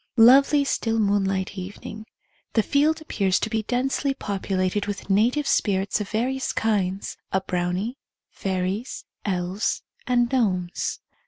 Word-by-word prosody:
Lov^^.y 275 +5 +7
still 225 -4 0
moonlight 195 -2 +1
evening. 205 +3 -8 0.5
The 220 - +3
field 305 +5 +2
appears 195 -11 +1
to 220 - -2
be 220 - +1
densely 270 +4 0
populated 195 -2 -1
with 205 -1 -4
native 240 +9 +3
spirits 195 -3 +1
of 205 - -5
various 255 +4 -1
kinds 195 -3 -1
— - - -51
a 190 - +2
brownie, 185 +7 -2 0.3
fairies, 190 +4 -3 0.2
elves, 185 +1 -1 0.2
and 240 -1 +2
gnomes. 185 -9 0
210 Hz, 130 wpm, -24 LUFS, 190-245 Hz, 0.5 s, Lov^^.y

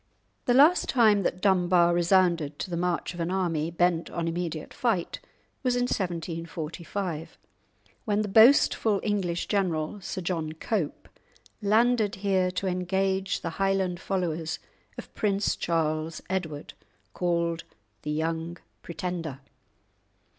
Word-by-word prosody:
The 245 - +3
last 305 +7 +5
time 215 -5 +4
that 180 -1 -2
Dunbar 180 -3 +4
resounded 170 -4 +2
to 185 - -5
the - - -1
march 175 0 -1
of 175 - -9
an 165 0 -1
army 170 -4 0
bent 170 0 +1
on 170 -1 -3
immediate 165 -2 -4
fight 220 -9 -1 0.4
was 250 -2 +1
in 245 - +1
1745, 170 -3 -4 0.7
when 210 0 +1
the - - -3
boastful 220 -1 +5
English 190 -5 -1
general, 185 -1 -1
Sir 185 +1 -5
John 165 -3 -2
Cope, 165 -1 -3 0.5
landed 220 0 +3
here 190 -1 +1
to 180 +2 -3
engage 190 +1 0
the 165 - -3
Highland 190 -2 +1
followers 170 -4 -2 0.4
of - - -9
Prince 200 -1 0
Charles 160 -1 -1
Edward 160 -6 -3 0.4
(called 170 -2 0 0.4
the 150 - -5
"Young 160 +2 -2 0.2
Pretender"). 170 -5 -5
180 Hz, 125 wpm, -27 LUFS, 165-195 Hz, 0.7 s, last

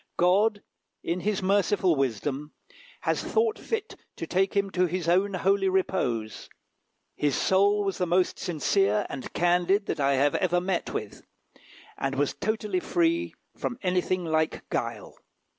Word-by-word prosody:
God, 205 +4 +3 0.4
in 170 +2 -1
his 200 +1 -1
merciful 195 -2 +2
wisdom, 135 +3 -2 0.5
has - - 0
thought 445 -1 +1
fit 445 0 -4 0.2
to - - -5
take 190 +2 0
him 200 -1 +1
to 180 0 +2
his 175 0 -3
own 190 +3 +2
holy 195 +1 +2
repose. 125 - -1 0.7
His 145 -2 0
soul 200 +2 +3
was 195 -1 -2
the 180 - 0
most 180 +2 +1
sincere 195 +4 +1
and 130 -2 -6
candid 180 +3 +2
that 160 - -3
I 140 0 +3
have 140 +2 +2
ever 175 -2 +1
met 180 0 -2
with, 105 - -6 0.8
and 135 0 -1
was 145 +1 0
totally 220 - -1
free 335 -1 0 0.2
from 245 - -4
anything 180 0 0
like 160 -1 -1
guile. - - -4
185 Hz, 145 wpm, -27 LUFS, 160-200 Hz, 0.8 s, God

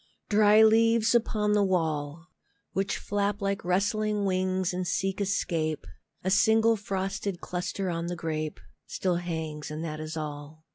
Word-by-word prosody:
Dry 210 +1 +6
leaves 225 +1 +4
upon 215 -3 +2
the 205 -1 +3
wall, 160 -4 -1 0.5
Which 195 +1 -1
flap 205 0 -1
like 200 -1 -2
rustling 205 +3 0
wings 185 -1 0
and 180 0 -2
seek 195 +1 -1
escape, 165 - -1 0.4
A 185 - 0
single 220 +3 +4
frosted 195 -2 -3
cluster 180 +2 -3
on 170 0 -3
the 175 - -3
grape 155 - -3 0.3
Still 180 -2 -1
hangs 160 -3 -4
and 155 +1 -5
that 155 -1 -5
is 155 +1 -5
all. 150 +1 -7
185 Hz, 145 wpm, -28 LUFS, 160-205 Hz, 0.5 s, Dry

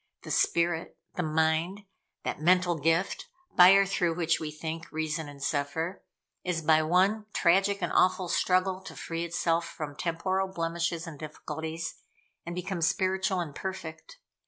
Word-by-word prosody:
The - - -6
Spirit 170 -1 +1 0.2
the - - -2
Mind 160 +4 +1 0.4
that - - -3
mental 180 +1 +4
gift, 165 +5 0 0.3
by 180 +1 +9
or 195 0 +6
through 175 -4 0
which 165 -1 +1
we 155 - -4
think, 160 +2 -6
reason, 155 0 -2
and 140 -1 -9
suffer, 160 +5 -2 0.4
is 170 -3 -2
by 155 0 +5
one 190 +7 +2
tragic 195 +2 +3
and 175 - -1
awful 185 0 +3
struggle 185 +2 +1
to - - -9
free 165 0 -4
itself 170 0 0
from 145 -2 -6
temporal 185 +4 -1
blemishes 170 -1 -2
and 160 -4 -9
difficulties, 160 +2 -5 0.5
and 170 - -4
become 180 0 -3
spiritual 190 +2 +1
and 155 -4 -5
perfect. 160 -3 -7
170 Hz, 150 wpm, -29 LUFS, 160-185 Hz, 0.5 s, by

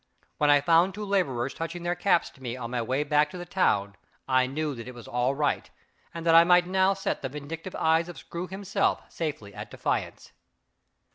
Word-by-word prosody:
When 150 - +3
I 145 -1 +6
found 170 +5 +3
two 210 0 -5
laborers 140 -11 0
touching 165 +1 -5
their 175 0 0
caps 180 -2 +1
to 135 - -21
me 125 -1 -4
on 120 -2 -6
my 125 -1 -1
way 130 +5 0
back 150 0 +2
to 180 - -8
the 175 - -6
town, 100 - +1 0.3
I 130 -1 +3
knew 150 +2 -2
that 115 -2 -8
it 125 - -8
was 120 - -11
all 125 +3 0
right, 145 0 0 0.4
and 165 0 -7
that 165 - +4
I 165 0 +9
might 180 0 +5
now 190 +1 +2
set 195 - -2
the 135 - -3
vindictive 155 +6 -7
eyes 160 +2 +2
of 175 - -9
Screw 170 +7 -6
himself 195 +1 -1
safely 140 -11 -4
at - - -8
defiance. - - -3
155 Hz, 210 wpm, -27 LUFS, 130-175 Hz, 0.4 s, I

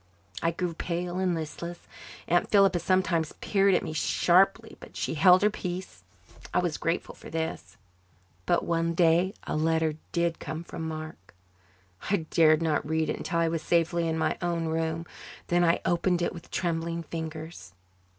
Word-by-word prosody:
I 165 - +2
grew 170 +1 -2
pale 175 +2 -3
and 185 -2 +1
listless. 170 +2 -5 0.5
Aunt 175 +1 +2
Philippa 195 -3 +4
sometimes 175 -3 +1
peered 195 -2 +2
at - - +1
me - - -4
sharply, 195 +7 +2
but - - -12
she - - -2
held 180 +4 +6
her 210 - +4
peace. 180 - -6 0.5
I - - 0
was 175 -4 0
grateful 165 +2 -2
for - - -12
this. 160 -6 -4 0.7
But - - +2
one 165 0 0
day 175 +4 +3
a - - -3
letter 160 0 +1
did 170 -1 0
come 160 +1 -5
from 165 -1 -6
Mark. 155 - -8 0.7
I 195 -5 +1
dared 155 -1 +5
not 160 -2 +1
read 160 +1 0
it - - -3
until 170 - -3
I 165 0 +3
was 165 -1 -1
safely 170 0 +1
in 160 0 -1
my 160 - 0
own 170 -1 -1
room. 160 +1 -1 0.4
Then 175 0 +3
I 170 0 +3
opened 175 0 +1
it - - -1
with 170 -2 -11
trembling 170 -1 -2
fingers. 160 - -7
170 Hz, 170 wpm, -28 LUFS, 160-175 Hz, 0.7 s, held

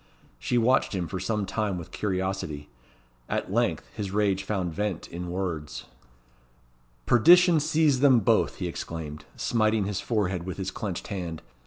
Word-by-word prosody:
She 120 - 0
watched 120 -2 +3
him 90 -3 -2
for 95 - -4
some 105 +2 -1
time 105 -2 -2
with 85 - -8
curiosity. 95 -7 -3 0.6
At - - -2
length - - +1
his 100 -2 -4
rage 100 -1 +1
found 95 -4 -2
vent 100 -1 -3
in 90 +1 -6
words. 85 -5 -4 1.2
"Perdition 175 +7 +6
seize 155 -3 +2
them 130 -4 +5
both!" - - +2
he - - -4
exclaimed, 75 -2 -6
smiting 110 -2 +1
his 100 -1 -2
forehead 95 -6 -1
with 95 +1 -6
his 95 0 -3
clenched 95 -2 -5
hand. 85 -5 -5
95 Hz, 150 wpm, -27 LUFS, 90-110 Hz, 1.2 s, Perdition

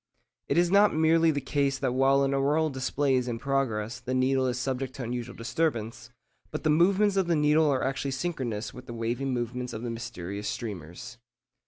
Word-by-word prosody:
It - - 0
is 175 0 +3
not 205 -1 +5
merely 160 +1 +4
the 145 -2 +1
case 140 0 0
that 135 -1 -1
while 135 +1 +3
an 135 0 +1
auroral 145 +3 +2
display 135 +1 0
is 125 -1 +1
in 120 -2 -2
progress 120 -4 -1
the 130 - -3
needle 130 0 +2
is 125 -1 -1
subject 130 0 -3
to 135 - -5
unusual 120 0 -4
disturbance, 120 -2 -2 0.4
but 155 - -5
the 155 - +3
movements 195 +5 +3
of 190 -2 +2
the 170 - +2
needle 150 +1 +3
are 130 -2 +1
actually 135 +1 -1
synchronous 130 -7 -3
with 125 0 -11
the 120 - -7
waving 120 +4 -2
movements 125 0 -3
of 110 +1 -6
the 120 - -3
mysterious 105 -3 -5
streamers. 105 +3 -7
130 Hz, 195 wpm, -28 LUFS, 120-150 Hz, 0.4 s, not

